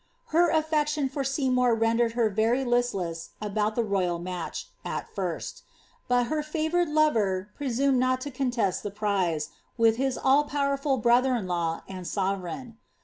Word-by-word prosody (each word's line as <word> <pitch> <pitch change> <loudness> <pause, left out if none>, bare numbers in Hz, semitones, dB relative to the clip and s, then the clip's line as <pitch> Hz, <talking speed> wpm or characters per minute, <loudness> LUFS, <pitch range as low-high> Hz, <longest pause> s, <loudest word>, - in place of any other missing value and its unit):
Her 340 +1 +5
affection 300 -3 +1
for 275 +1 -3
Seymour 255 -3 +2
rendered 230 +1 +2
her 235 -1 +2
very 225 +5 +1
listless 195 -9 -1
about 215 +1 -1
the 235 - +1
royal 190 -5 0
match, 175 0 -5
at - - -4
first;' - - -4 0.5
but 245 -1 +3
her 305 +5 -1
favoured 315 +2 0
lover 210 -11 +1
presumed 270 -1 +1
not 255 0 +2
to 285 - -5
con 260 0 -1
test 225 -7 0
the 205 - -4
prize, 190 -7 -1 0.3
with 225 -1 +4
his 265 0 0
all 280 +3 +4
powerful 280 -1 0
brother 245 +2 +3
in 220 -5 -2
law 170 -2 -2
and 185 -2 -7
sovereign. 200 +5 -3
240 Hz, 155 wpm, -27 LUFS, 200-275 Hz, 0.5 s, Her